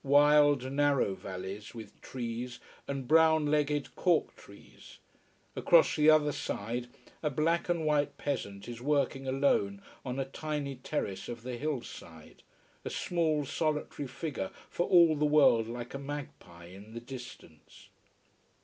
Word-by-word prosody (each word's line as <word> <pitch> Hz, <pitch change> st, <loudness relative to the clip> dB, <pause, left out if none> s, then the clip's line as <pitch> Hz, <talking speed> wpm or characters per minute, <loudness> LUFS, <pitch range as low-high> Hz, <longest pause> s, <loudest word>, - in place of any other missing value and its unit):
Wild, 145 Hz, -1 st, +5 dB
narrow 140 Hz, -7 st, +2 dB
valleys, 95 Hz, +3 st, -7 dB
with 110 Hz, -3 st, -11 dB
trees, 120 Hz, 0 st, -5 dB, 0.3 s
and 140 Hz, -2 st, -4 dB
brown 160 Hz, 0 st, +5 dB
legged 150 Hz, -1 st, 0 dB
cork 175 Hz, -3 st, +1 dB
trees. -, -, -16 dB, 0.6 s
Across -, -, +4 dB
the 150 Hz, 0 st, +5 dB
other 155 Hz, -1 st, +5 dB
side 120 Hz, 0 st, -4 dB, 0.3 s
a 150 Hz, -, 0 dB
black 165 Hz, +5 st, 0 dB
and 170 Hz, -2 st, 0 dB
white 145 Hz, -1 st, +1 dB
peasant 100 Hz, -9 st, -4 dB
is 120 Hz, -1 st, -7 dB
working 135 Hz, -1 st, 0 dB
alone 130 Hz, -7 st, +1 dB, 0.2 s
on 125 Hz, 0 st, -4 dB
a 135 Hz, -, -1 dB
tiny 140 Hz, -1 st, -4 dB
terrace 125 Hz, -7 st, -4 dB
of 120 Hz, -1 st, -7 dB
the 125 Hz, 0 st, -4 dB
hill 140 Hz, 0 st, -2 dB
side, 80 Hz, -2 st, -12 dB, 0.4 s
a -, -, -4 dB
small, 160 Hz, -4 st, 0 dB
solitary 150 Hz, -1 st, -2 dB
figure, 130 Hz, -, -4 dB, 0.2 s
for 175 Hz, -, -1 dB
all 170 Hz, -3 st, +6 dB
the 150 Hz, -, -1 dB
world 145 Hz, -7 st, +5 dB
like 120 Hz, +1 st, -6 dB
a 135 Hz, -, -4 dB
magpie 140 Hz, -, -8 dB
in 100 Hz, +5 st, -12 dB
the -, -, -4 dB
distance. 120 Hz, -, -12 dB
140 Hz, 140 wpm, -31 LUFS, 120-150 Hz, 0.6 s, all